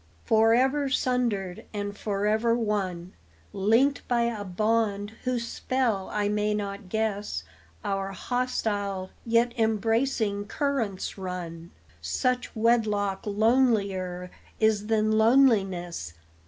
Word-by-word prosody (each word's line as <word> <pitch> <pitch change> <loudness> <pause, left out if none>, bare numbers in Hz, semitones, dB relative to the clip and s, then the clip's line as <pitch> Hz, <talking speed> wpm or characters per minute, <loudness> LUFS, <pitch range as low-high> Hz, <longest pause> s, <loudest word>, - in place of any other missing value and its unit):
Forever 255 +6 +3
sundered 235 -8 -1
and 205 0 -3
forever 215 +3 +1
one, 190 -6 -2 0.4
Linked 230 +8 +2
by 240 -1 +2
a 230 -3 -2
bond 205 +1 0
whose 245 -2 -1
spell 230 -9 -1
I 210 -1 0
may 210 0 0
not 200 -2 -5
guess, 205 - -2 0.4
Our 195 0 -2
hostile, 205 -4 -2 0.2
yet 235 +1 +3
embracing 225 -1 +1
currents 230 -10 -2
run; 175 -3 -6 0.3
Such 250 - -1
wedlock 215 -4 +1
lonelier 200 -5 +1 0.3
is 215 -1 +2
than 215 0 +2
loneliness. 195 - +2
210 Hz, 100 wpm, -27 LUFS, 195-235 Hz, 0.4 s, Forever